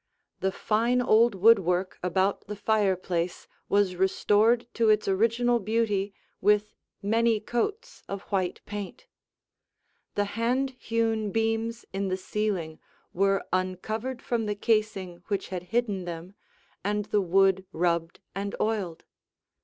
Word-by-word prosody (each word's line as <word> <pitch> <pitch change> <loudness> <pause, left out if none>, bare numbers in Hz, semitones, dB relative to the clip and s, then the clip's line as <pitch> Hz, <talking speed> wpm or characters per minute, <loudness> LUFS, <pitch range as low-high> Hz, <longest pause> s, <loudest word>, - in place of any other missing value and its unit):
The 190 - 0
fine 230 +5 +1
old 235 -2 +4
woodwork 185 -3 +3
about 190 +3 0
the 210 - -5
fireplace 190 -5 0 0.2
was 200 -2 +2
restored 210 +5 +3
to 225 -1 +2
its 215 0 +3
original 230 +5 +2
beauty 210 -2 0 0.3
with 210 +1 +3 0.3
many 225 +1 +2
coats 410 - -3
of 200 0 -4
white 185 -2 0
paint. 205 - -7 1.1
The 205 - +1
hand 240 +6 0
hewn 225 -2 0
beams 225 +2 -1
in 195 0 -1
the 185 0 -1
ceiling 190 -5 -2 0.3
were 195 +1 +2
uncovered 215 +7 -2
from 230 -3 -1
the 210 - -1
casing 205 -5 0
which 200 -2 -2
had 185 -2 -3
hidden 210 -5 0
them, 175 +2 -7 0.5
and 210 +1 0
the 205 0 +1
wood 190 +1 +3
rubbed 170 -1 -1
and 200 +1 -3
oiled. 200 -7 -1
205 Hz, 125 wpm, -27 LUFS, 190-225 Hz, 1.1 s, old